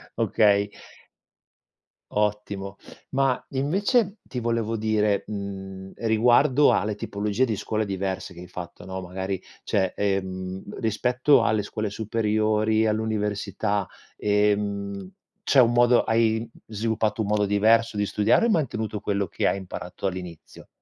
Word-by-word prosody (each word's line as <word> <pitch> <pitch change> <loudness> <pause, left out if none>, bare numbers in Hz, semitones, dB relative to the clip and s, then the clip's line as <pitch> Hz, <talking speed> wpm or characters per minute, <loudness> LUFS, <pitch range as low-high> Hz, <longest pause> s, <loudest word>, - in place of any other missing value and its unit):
okay. 100 -1 +3 1.4
Ottimo. 105 -2 -2 0.3
Ma 135 -1 +1
invece 195 - +1
ti 125 - -6
volevo 115 -1 -1
dire, 105 -2 +1
mhmm, 95 -2 -6
riguardo 125 +5 +4
alle 105 -1 +1
tipologie 105 +4 -1
di 110 -4 -1
scuole 110 +2 -2
diverse 95 -1 -3
che 85 - -10
hai 90 - -10
fatto, 90 -1 -9
no, 95 0 -5
magari 95 +1 -4 0.2
cioè, 95 -4 +1
ehm, 95 -1 -3
rispetto 125 +4 +3
alle 105 -1 +1
scuole 105 +1 -3
superiori, 110 +1 +1
all'università, 105 -2 -1 0.3
ehm, 100 -2 0 0.3
c'è 135 - +4
un 120 0 +4
modo 120 0 +5
hai 115 0 +1 0.2
sviluppato 110 0 -1
un 105 - -1
modo 105 0 +2
diverso 110 +2 +3
di 105 - +1
studiare 105 - +2
o - - +4
hai 235 - +3
mantenuto 110 - -1
quello 100 -1 -1
che - - -1
hai - - +1
imparato 95 0 -7
all'inizio? 90 -3 -8
105 Hz, 130 wpm, -25 LUFS, 100-115 Hz, 1.4 s, modo